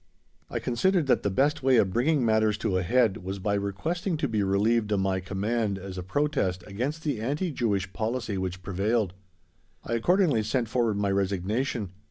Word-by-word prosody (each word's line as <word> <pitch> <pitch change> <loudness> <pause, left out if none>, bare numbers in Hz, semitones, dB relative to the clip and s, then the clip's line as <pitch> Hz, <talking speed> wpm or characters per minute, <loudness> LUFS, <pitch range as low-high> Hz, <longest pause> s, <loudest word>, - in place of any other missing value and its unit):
I - - -3
considered 170 +8 +1
that 135 - +3
the 100 - 0
best 145 +9 +1
way 130 -1 +4
of 100 -4 +3
bringing 135 +2 +2
matters 110 -1 +2
to 100 -3 -1
a 90 - +2
head 115 +1 +2
was 95 +2 -5
by 100 +2 -1
requesting 155 - -2
to 150 - 0
be 110 -4 0
relieved 105 +3 +2
of 100 - +2
my 95 0 +1
command 100 +2 -1
as 95 0 -7
a 90 - -4
protest 95 - -1
against 130 +11 -3
the 145 -8 -1
anti 150 +9 -1
Jewish 100 -8 -1
policy 115 -1 -2
which 95 -1 -4
prevailed. 100 +1 0 0.7
I 115 - -4
accordingly 155 - +3
sent 115 +1 -1
forward 115 -3 +1
my 100 -1 +1
resignation. 100 +3 -1
110 Hz, 185 wpm, -27 LUFS, 95-130 Hz, 0.7 s, way